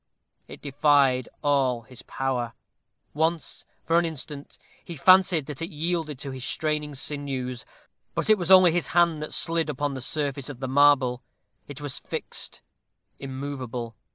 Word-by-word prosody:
It - - -12
defied 140 -3 +3
all 135 -5 +2
his 125 +2 -11
power. 125 -3 -2 0.6
Once, 160 +2 -1 0.2
for 165 +1 +4
an 170 - 0
instant, 145 -2 -6 0.3
he 170 - -8
fancied 180 0 +5
that 150 0 -7
it 165 - -3
yielded 160 -2 -2
to 140 +1 -6
his 130 -1 -7
straining 150 +1 -2
sinews, 130 -3 -3 0.5
but - - -1
it 215 -2 +5
was 175 -1 -2
only 185 -2 +8
his 175 +1 0
hand 170 -3 +4
that 150 - -5
slided 165 -1 0
upon 145 0 -2
the 130 - -6
surface 140 0 -2
of 135 -4 -8
the 130 - -3
marble. 130 -2 +4 0.5
It 145 0 -9
was 145 -3 -2
fixed - - -6 0.6
immovable. 130 -4 -5
145 Hz, 155 wpm, -26 LUFS, 130-160 Hz, 0.6 s, only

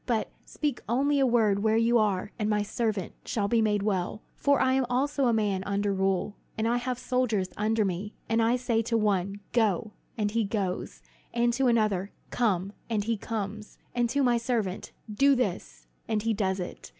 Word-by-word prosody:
But 230 -3 0
speak 290 -5 -2
only 280 +4 +2
a 270 - +4
word 215 -4 +3
where 220 +1 +3
you 230 +1 +4
are, 205 -2 0
and 210 0 0
my 210 -1 +2
servant 210 -3 -2
shall 205 -3 -1
be 230 +1 +3
made 210 -2 +1
well. 200 0 -1
For 280 -1 +2
I 260 0 +3
also 265 +3 +1
am - - +4
a 235 - +3
man 205 -4 0
under 200 0 0
rule, 195 +1 0 0.2
and 220 +1 0
I 240 +1 +2
have 250 0 -2
soldiers 240 -7 0
under 215 +1 +1
me; 195 +3 -3
and 225 0 +2
I 230 +2 +3
say 240 -2 +1
to 230 +1 0
one 200 -2 0
'Go,' 215 -3 +1 0.3
and 210 -2 0
he 225 +1 +1
goes; 195 -3 -3 0.3
and 240 0 +2
to 265 +2 +2
another, 215 -5 +2 0.2
'Come,' 200 -5 0 0.2
and 215 -3 0
he 230 +2 0
comes; 215 0 -5 0.2
and 240 -1 +1
to 280 +3 +1
my 245 -2 +3
servant, 230 -6 -2 0.2
'Do 275 +5 +4
this,' 175 - -3 0.2
and 215 -2 0
he 225 0 +1
does 190 -2 0
it. 180 - -7
220 Hz, 195 wpm, -28 LUFS, 200-240 Hz, 0.3 s, a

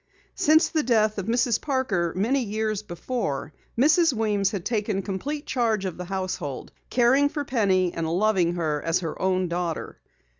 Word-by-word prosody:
Since 315 +2 +4
the 315 - +1
death 215 -4 +2
of 195 - -5
Mrs. 235 0 +1
Parker 240 - 0
many 235 +9 +1
years 215 -1 -2
before 175 - -4 0.2
Mrs. 310 +4 +4
Weems 210 -4 +1
had 200 -4 -5
taken 210 -4 -1
complete 285 +10 -4
charge 225 -6 0
of 185 - -4
the 180 - -5
household, 185 -7 -4 0.2
caring 260 +4 +4
for 290 0 -4
Penny 190 -8 +1
and 165 -1 -2
loving 180 -2 +2
her 155 -4 -1
as 165 +2 0
her 165 -3 -5
own 185 -1 +1
daughter. 170 -1 -3
205 Hz, 160 wpm, -25 LUFS, 180-245 Hz, 0.2 s, Since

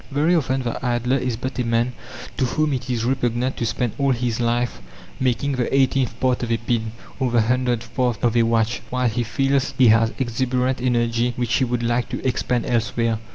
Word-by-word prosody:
Very 150 +5 +2
often 130 -4 0
the 120 0 -4
idler 125 +1 +1
is 125 -2 -2
but 130 +2 -5
a - - +2
man 115 +1 0 0.4
to 130 - +2
whom 150 +4 0
it 125 -1 -4
is 115 -2 -1
repugnant 125 0 0
to 115 - -1
spend 115 +1 -1
all 140 0 +2
his 120 -1 -2
life 120 - 0 0.4
making 130 +2 0
the 125 -3 -1
eighteenth 130 -3 +1
part 130 -1 +1
of 120 -1 -3
a 115 - +2
pin, 115 -1 -2 0.3
or 130 - +1
the 120 -1 +3
hundredth 120 0 0
part 125 -3 +1
of 120 -1 +2
a 120 - +5
watch, 115 0 +1
while 125 0 0
he 115 +1 -1
feels 135 +4 0
he 125 -3 +6
has 115 +1 +4
exuberant 125 +1 -1
energy 120 -1 +1
which 120 -2 -1
he 130 - +2
would 120 -1 -2
like 120 +1 0
to - - -3
expend 125 -1 0
elsewhere. 115 -1 0
120 Hz, 205 wpm, -22 LUFS, 115-130 Hz, 0.4 s, he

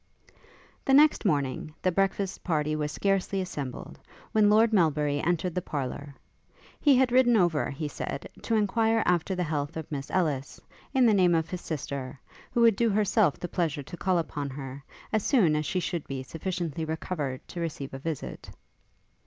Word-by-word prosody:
The 270 - +4
next 300 -3 +5
morning, 145 -2 -1
the 185 - +3
breakfast 195 +1 -1
party 155 -3 0
was 150 -1 -2
scarcely 195 +2 0
assembled, 145 -8 -5 0.3
when 215 -1 +4
Lord 220 +2 +4
Melbury 150 -6 +2
entered 175 +1 0
the 180 - -1
parlour. 140 -1 -5 0.6
He 285 -3 +5
had 255 -1 +3
ridden 245 -2 +5
over, 175 -6 +2
he 150 +2 -4
said, - - -5
to 230 - 0
enquire 225 +1 +2
after 180 +2 +1
the 180 - -1
health 150 -2 -3
of 160 -1 -7
Miss 140 -1 -4
Ellis, 150 -7 -1 0.3
in 265 -2 +4
the 225 - +5
name 180 -3 +4
of 160 0 -1
his 180 -1 -4
sister, 140 -3 -5 0.3
who 240 - +1
would 230 -3 +6
do 235 -1 +3
herself 205 -4 +2
the 175 - -4
pleasure 160 -5 -1
to 155 - -9
call 185 +1 +1
upon 145 -4 -3
her, 135 0 -7 0.3
as 215 - +3
soon 195 - +3
as 150 -1 -1
she 185 - 0
should 170 -2 -3
be 135 -1 -4
sufficiently 165 +1 -4
recovered 155 -4 -4
to 175 - -6
receive 150 -5 -4
a 135 - -5
visit. 155 0 -5
170 Hz, 180 wpm, -28 LUFS, 145-200 Hz, 0.6 s, would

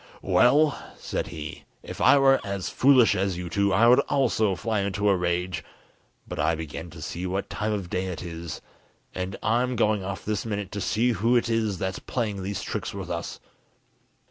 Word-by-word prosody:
"Well," 145 +4 +4
said - - -3
he, 80 -3 -8 0.2
"if - - -8
I - - +7
were 135 -1 +5
as 100 -2 -3
foolish 130 -3 +5
as 95 -1 0
you 90 -1 -5
two, 100 +4 +1
I 100 +5 +4
would 125 +2 +7
also 110 -7 +2
fly 110 +3 -1
into 100 +1 -1
a 100 - +4
rage, 90 0 -1 0.6
but - - -6
I 85 - +2
begin 80 +1 -6
to 80 -1 -10
see 90 +4 -4
what 95 +2 -3
time 110 0 -2
of 100 -4 -2
day 95 +1 -1
it 90 -2 -5
is, 85 -1 -6 0.5
and 95 +1 -4
I'm 125 +3 +1
going 105 -3 +1
off 95 0 -5
this 105 -1 -1
minute 105 -4 -4
to 100 - -4
see 115 +5 +1
who 115 +3 +2
it 120 -1 +2
is 110 -4 0
that's 95 0 -3
playing 105 -6 -3
these 100 +1 -4
tricks - - -4
with - - -6
us." - - -4
100 Hz, 195 wpm, -26 LUFS, 90-115 Hz, 0.6 s, I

